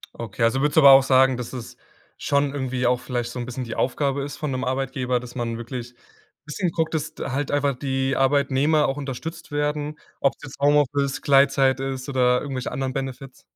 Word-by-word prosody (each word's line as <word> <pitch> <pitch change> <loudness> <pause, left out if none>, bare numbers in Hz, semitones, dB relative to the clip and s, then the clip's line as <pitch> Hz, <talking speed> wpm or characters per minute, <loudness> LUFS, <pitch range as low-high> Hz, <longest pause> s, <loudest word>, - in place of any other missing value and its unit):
Okay, 115 -1 -4
also, 125 +4 +2
würdest 150 +2 0
du - - +8
aber 140 -1 +9
auch 135 0 +9
sagen, 130 -1 +4
dass 125 0 -6
es 125 -3 -7 0.4
schon 140 0 +1
irgendwie 130 -3 -2
auch 125 0 +2
vielleicht 120 -1 -3
so 125 - -6
'n 120 - -3
bisschen 130 +1 -5
die 115 -2 -6
Aufgabe 140 +2 0
ist 145 0 -6
von 150 -2 -3
'nem 130 0 -2
Arbeitgeber, 130 -1 -1
dass 120 0 -10
man 115 -2 -3
wirklich 120 +1 -7 0.5
bisschen 175 +5 -2
guckt, 160 -1 -1
dass 160 0 -3
d - - -5
halt 140 +2 -2
einfach 145 -1 +1
die 135 +1 -1
Arbeitnehmer 140 +2 +2
auch 135 - -2
unterstützt 145 +4 -6
werden, 150 0 -2 0.2
ob's 140 - +1
jetzt 140 -1 -10
Homeoffice, 145 -1 +2
Gleitzeit 135 -1 +4
ist 135 0 -4
oder 125 -2 +2
irgendwelche 135 -3 -4
anderen 130 0 -3
Benefits? 135 0 -6
135 Hz, 200 wpm, -23 LUFS, 125-145 Hz, 0.5 s, aber